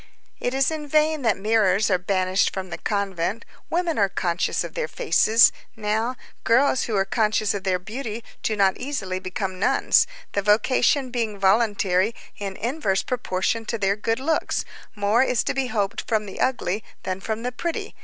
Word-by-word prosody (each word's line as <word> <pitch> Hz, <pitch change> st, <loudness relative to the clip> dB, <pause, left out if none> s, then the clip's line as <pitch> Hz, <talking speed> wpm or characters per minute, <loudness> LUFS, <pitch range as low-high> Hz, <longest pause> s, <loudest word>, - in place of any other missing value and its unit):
It 245 Hz, +1 st, -2 dB
is 270 Hz, +3 st, +2 dB
in 305 Hz, -2 st, -5 dB
vain 305 Hz, +1 st, +2 dB
that 225 Hz, -5 st, +2 dB
mirrors 210 Hz, -1 st, +2 dB
are 185 Hz, -, +3 dB
banished 185 Hz, +1 st, +1 dB
from 190 Hz, -1 st, -6 dB
the -, -, -5 dB
convent, 200 Hz, 0 st, -2 dB, 0.2 s
women 340 Hz, -5 st, 0 dB
are 200 Hz, -1 st, +3 dB
conscious 175 Hz, -1 st, -1 dB
of -, -, -7 dB
their -, -, -2 dB
faces; 225 Hz, -, +4 dB, 0.2 s
now, 220 Hz, +3 st, -1 dB, 0.3 s
girls 260 Hz, +2 st, +3 dB
who 225 Hz, -, -2 dB
are 195 Hz, -1 st, +2 dB
conscious 215 Hz, 0 st, +1 dB
of 200 Hz, -1 st, -5 dB
their 185 Hz, -1 st, +2 dB
beauty 220 Hz, +4 st, -6 dB, 0.2 s
do 220 Hz, -, 0 dB
not 195 Hz, -2 st, +3 dB
easily 220 Hz, -9 st, -3 dB
become 185 Hz, 0 st, -4 dB
nuns; 460 Hz, -, +3 dB, 0.2 s
the 200 Hz, -, 0 dB
vocation 245 Hz, +6 st, +2 dB
being 225 Hz, -4 st, -2 dB
voluntary 200 Hz, 0 st, +2 dB, 0.2 s
in 195 Hz, -2 st, -5 dB
inverse 225 Hz, -4 st, -1 dB
proportion 230 Hz, -2 st, -1 dB
to 230 Hz, -, -2 dB
their 200 Hz, -1 st, +1 dB
good 225 Hz, +3 st, -1 dB
looks, 315 Hz, +4 st, 0 dB, 0.3 s
more 205 Hz, +3 st, +2 dB
is 250 Hz, -3 st, +2 dB
to -, -, -1 dB
be 270 Hz, -1 st, -1 dB
hoped 205 Hz, -4 st, -1 dB
from 215 Hz, -2 st, 0 dB
the 195 Hz, -, -9 dB
ugly 215 Hz, -5 st, 0 dB, 0.2 s
than 185 Hz, 0 st, -3 dB
from 220 Hz, +2 st, -3 dB
the 250 Hz, -, -2 dB
pretty. 330 Hz, +7 st, -4 dB
215 Hz, 175 wpm, -24 LUFS, 195-245 Hz, 0.3 s, faces